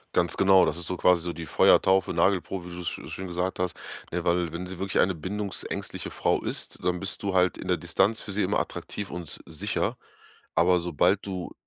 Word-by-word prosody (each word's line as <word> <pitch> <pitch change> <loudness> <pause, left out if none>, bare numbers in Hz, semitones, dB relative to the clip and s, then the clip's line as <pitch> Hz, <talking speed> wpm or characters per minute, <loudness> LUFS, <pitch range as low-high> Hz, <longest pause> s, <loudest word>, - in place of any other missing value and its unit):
Ganz 85 -2 +1
genau, 95 -1 +6
das 75 - -1
ist 85 - -4
so 90 - -2
quasi 90 -1 +4
so 85 -1 -3
die 80 -2 -7
Feuertaufe, 95 +6 +4
Nagelprobe, 95 -1 +1
wie 85 - -8
du's 90 -1 -6
scho - - -5
schön 95 - -6
gesagt 90 +1 -2
hast. 90 -1 -1 0.4
Ne, 90 0 -2
weil 85 -2 +1
wenn 90 +2 -4
sie 95 0 -7
wirklich 95 +1 +1
eine 95 -1 +2
bindungsängstliche 100 +4 -4
Frau - - +1
ist, - - -3
dann 90 -1 +1
bist 100 +1 -3
du 100 -1 -1
halt 90 -1 +3
in - - -7
der - - +2
Distanz 105 +4 +1
für 100 - -7
sie 105 +2 +1
immer - - +1
attraktiv 100 -2 -5
und 90 -1 -5
s - - -8
sicher, 80 -2 -2 0.6
aber 90 +1 +4
sobald 90 +4 +2
du 95 -3 -5
90 Hz, 215 wpm, -27 LUFS, 85-95 Hz, 0.6 s, genau